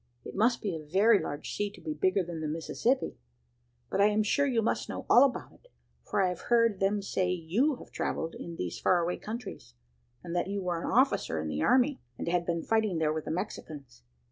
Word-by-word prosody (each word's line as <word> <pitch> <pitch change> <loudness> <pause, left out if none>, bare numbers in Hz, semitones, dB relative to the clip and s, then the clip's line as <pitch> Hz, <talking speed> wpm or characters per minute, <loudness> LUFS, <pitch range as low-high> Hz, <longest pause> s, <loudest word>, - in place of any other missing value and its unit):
It - - -7
must 230 +4 +2
be 195 -5 -1
a 155 - -6
very 200 +8 +4
large 145 - -5
sea 205 0 -1
to - - -13
be 155 - -4
bigger 185 +5 +1
than 170 -2 -6
the 155 - -2
Mississippi! 165 - -1 0.7
But 195 - +1
I 205 - +7
am 210 +1 +2
sure 285 +7 +2
you 235 -4 +1
must - - -1
know - - -5
all 245 - +7
about 275 -2 0
it, - - -23 0.4
for 200 - +2
I 185 - +2
have 180 -1 -7
heard 230 -4 +3
them 200 +1 +1
say 185 -2 0
you 180 - +1
have - - -13
travelled 165 +1 -2
in 170 - -7
these 90 - -4
far 185 - +3
away 175 +1 -1
countries, 215 - -7 0.5
and 170 0 -5
that 175 - 0
you 200 0 -3
were 175 -2 -2
an - - -3
officer 255 - +2
in 80 0 -3
the 75 0 -2
army, 255 - +3 0.2
and - - -5
had 175 0 0
been 170 -1 -1
fighting 220 -5 +1
there 155 -1 +1
with 155 -1 -4
the - - -5
Mexicans. 155 - -6
185 Hz, 225 wpm, -29 LUFS, 165-220 Hz, 0.7 s, I